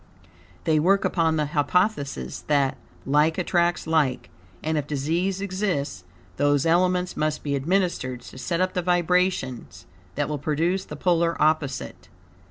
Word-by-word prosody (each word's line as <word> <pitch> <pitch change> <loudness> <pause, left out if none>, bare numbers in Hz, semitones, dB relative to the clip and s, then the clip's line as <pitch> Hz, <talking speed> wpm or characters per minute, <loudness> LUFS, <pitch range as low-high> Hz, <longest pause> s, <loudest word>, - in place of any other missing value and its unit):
They 155 -1 +2
work 195 +5 +3
upon 165 -2 +1
the 150 -1 +1
hypothesis 150 +1 0
that, 140 -3 +2 0.3
like 150 +3 +3
attracts 175 -1 +1
like, 155 -6 0 0.3
and, 160 +1 0
if 145 -2 -1
disease 170 +7 -1
exist, 180 - -2 0.3
those 145 0 +2
elements 180 +2 +2
must 155 0 -1
be 140 -1 -1
administered 140 -5 -1
to 130 - -11
set 170 +5 -1
up 185 0 +1
the 180 - 0
vibrations 175 - 0 0.3
that - - 0
will 150 -1 -3
produce 165 +6 0
the - - -8
polar 170 -2 +1
opposite. 140 - -1
160 Hz, 140 wpm, -24 LUFS, 145-180 Hz, 0.3 s, work